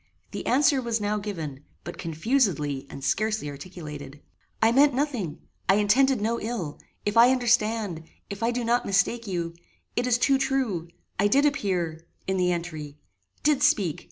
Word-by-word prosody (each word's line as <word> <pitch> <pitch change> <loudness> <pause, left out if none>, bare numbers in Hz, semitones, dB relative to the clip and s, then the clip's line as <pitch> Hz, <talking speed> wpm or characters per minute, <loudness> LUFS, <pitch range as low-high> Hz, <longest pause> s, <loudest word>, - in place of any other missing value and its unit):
The - - -5
answer 275 +1 +4
was 235 -2 -1
now 210 0 -1
given, 160 -9 -6 0.2
but 175 - -8
confusedly 160 - 0
and 135 - -9
scarcely 215 -7 0
articulated. 145 -2 -9 0.4
"I 225 +1 +4
meant 280 +2 +5
nothing 245 - -2 0.3
I 195 - +7
intended 245 +5 +3
no 225 +3 0
ill 215 -10 -4 0.3
if 205 +1 0
I 235 +2 +8
understand 225 -8 +1 0.2
if 200 +1 -7
I 230 - +2
do 240 0 -1
not 235 +1 +2
mistake 200 +4 +1
you 170 -3 -3 0.4
it 245 +1 0
is 245 -1 +3
too 270 +2 +3
true 245 -12 0 0.3
I 205 - +4
did 280 +7 +4
appear 180 - -1 0.2
in 190 0 -1
the 180 -1 +2
entry 160 -4 -5 0.5
did 295 -3 +3
speak. 210 - +2
210 Hz, 160 wpm, -26 LUFS, 170-245 Hz, 0.5 s, I